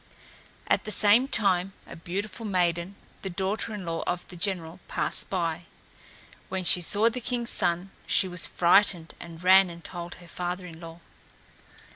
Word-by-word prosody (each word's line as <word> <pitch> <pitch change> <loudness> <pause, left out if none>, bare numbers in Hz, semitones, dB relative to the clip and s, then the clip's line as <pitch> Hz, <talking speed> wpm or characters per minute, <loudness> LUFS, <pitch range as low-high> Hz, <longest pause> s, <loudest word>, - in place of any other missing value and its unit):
At - - +1
the - - -5
same 215 +5 +5
time 195 -6 +2
a - - -11
beautiful 190 +5 -6
maiden, 180 -2 -1 0.3
the 190 - -5
daughter 195 +5 -2
in 205 -4 -6
law 165 -1 -3
of 175 0 -3
the 180 - -10
general, 175 -2 -3
passed - - -1
by. 170 -2 -2 0.8
When 185 0 -3
she 180 0 +6
saw 205 +6 +3
the 240 +2 -2
king's 240 -1 -2
son 175 +3 0 0.2
she 190 - +2
was 180 -1 +3
frightened 175 -1 +3
and 170 0 -11
ran 190 0 +6
and 170 0 -11
told 175 -1 -7
her 175 - -15
father 180 +2 -5
in 165 -2 -11
law. 165 0 -11
180 Hz, 165 wpm, -27 LUFS, 170-200 Hz, 0.8 s, she